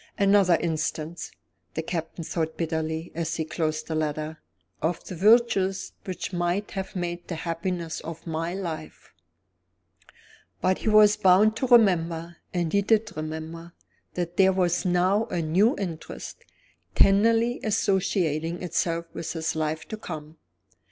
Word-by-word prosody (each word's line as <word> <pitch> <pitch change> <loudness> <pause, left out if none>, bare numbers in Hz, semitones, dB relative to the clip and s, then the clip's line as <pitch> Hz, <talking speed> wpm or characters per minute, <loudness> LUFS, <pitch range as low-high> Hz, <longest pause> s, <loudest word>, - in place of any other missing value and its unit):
"Another 200 -3 +5
instance," 160 0 -3 0.5
the 160 - -2
Captain 165 0 -4
thought 160 0 -3
bitterly, 160 0 -2
as 165 0 -2
he 160 - -2
closed 155 -1 -2
the 160 - -4
letter, 155 0 -2 0.4
"of 165 +2 -1
the 185 - -7
virtues 200 -1 +3
which 185 0 -5
might 175 +3 -1
have 190 0 -5
made 175 -1 -4
the 170 - -4
happiness 170 0 -3
of 165 0 -8
my 165 +2 -3
life!" 165 -5 -6 1.5
But 185 0 +1
he - - -1
was 210 -1 +6
bound 210 +2 +5
to 260 - -1
remember 170 -8 +3
and 175 -3 -1
he 200 - +4
did 215 -1 +1
remember 160 +2 -6 0.4
that 175 -1 -3
there 190 -1 +5
was 180 0 +1
now 185 +4 +2
a - - -3
new 180 +9 +3
interest, 170 -5 -6 0.5
tenderly 230 +4 +4
associating 180 -6 0
itself 170 -1 -1
with 165 - -4
his 160 -1 -2
life 155 0 -2
to 220 - -4
come. 160 -6 -8
175 Hz, 140 wpm, -26 LUFS, 160-195 Hz, 1.5 s, was